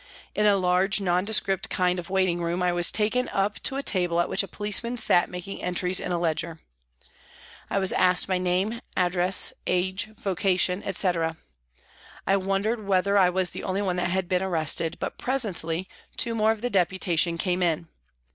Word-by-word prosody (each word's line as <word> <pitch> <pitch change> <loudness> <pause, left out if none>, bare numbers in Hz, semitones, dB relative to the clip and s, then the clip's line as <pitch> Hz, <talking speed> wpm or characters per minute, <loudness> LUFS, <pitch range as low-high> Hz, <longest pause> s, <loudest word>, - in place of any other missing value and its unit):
In 210 0 +2
a 200 -1 +4
large, 185 +2 +2
nondescript 195 +1 +1
kind 180 0 0
of 170 - -8
waiting 185 -2 +1
room 170 +2 -1
I 180 - +2
was 175 0 +2
taken 225 +4 0
up 200 +1 -1
to 265 - 0
a 275 - -3
table 175 -6 0
at 175 - +1
which - - +2
a 195 - -6
policeman 210 +5 -2
sat 200 -6 +2
making 180 +2 -7
entries 180 +1 0
in 180 - -4
a 175 - 0
ledger. 165 -1 -2 1.1
I - - -1
was 190 -1 +2
asked 180 -1 +3
my 185 -1 0
name, 185 +6 -1 0.2
address, 180 0 +2
age, 185 +4 0
vocation, 185 0 0
etc. 170 -4 0 0.9
I 195 - +3
wondered 195 +3 -2
whether 200 +1 +2
I 190 -3 +5
was 185 0 +1
the - - -7
only 195 +1 -2
one 180 -2 -1
that 180 - 0
had 185 0 -1
been 180 0 0
arrested, 165 -3 0
but - - -5
presently 190 -9 -1 0.3
two 235 -2 +2
more 220 -1 +2
of 220 -1 -4
the 245 0 -2
Deputation 175 -3 +1
came 180 0 -1
in. 170 -1 0
185 Hz, 180 wpm, -25 LUFS, 175-200 Hz, 1.1 s, I